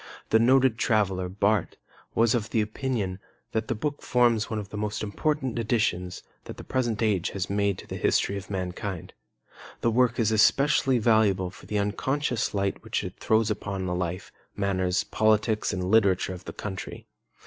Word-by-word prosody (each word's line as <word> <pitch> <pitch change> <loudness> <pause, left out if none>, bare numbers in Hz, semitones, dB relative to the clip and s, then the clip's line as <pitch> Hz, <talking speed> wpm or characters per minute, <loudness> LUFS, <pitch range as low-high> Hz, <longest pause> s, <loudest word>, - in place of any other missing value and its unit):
The 110 - +6
noted 130 0 +4
traveller, 95 -5 +1
Barth, 100 0 0 0.4
was 115 0 +4
of 115 -3 -1
the 115 - +1
opinion 105 -3 -2 0.3
that 110 0 -1
the 120 - -1
book 145 +7 -3
forms 120 -3 +2
one 110 - -2
of 105 -2 -5
the - - -9
most 105 +1 -3
important 130 +3 -1
additions 105 -6 -1 0.2
that - - -8
the - - -8
present 120 -4 -1
age 100 -5 +1
has 95 0 -3
made 100 -1 +1
to - - -10
the - - -6
history 100 - +1
of 100 -1 -7
mankind. 95 -1 -4 0.7
The 115 - +2
work 120 0 +2
is 110 -2 +2
especially 135 +4 +4
valuable 105 -5 +2
for - - -15
the 105 - -1
unconscious 115 +4 -1
light 100 0 -1
which - - -2
it - - -7
throws 110 0 +2
upon 100 -2 -3
the 90 - -2
life, 90 +1 -3 0.2
manners, 95 -2 0
politics, 110 0 +1
and 95 -3 -3
literature 95 -2 +3
of 90 +1 -10
the - - -7
country. 95 -3 -6
105 Hz, 175 wpm, -26 LUFS, 95-115 Hz, 0.7 s, The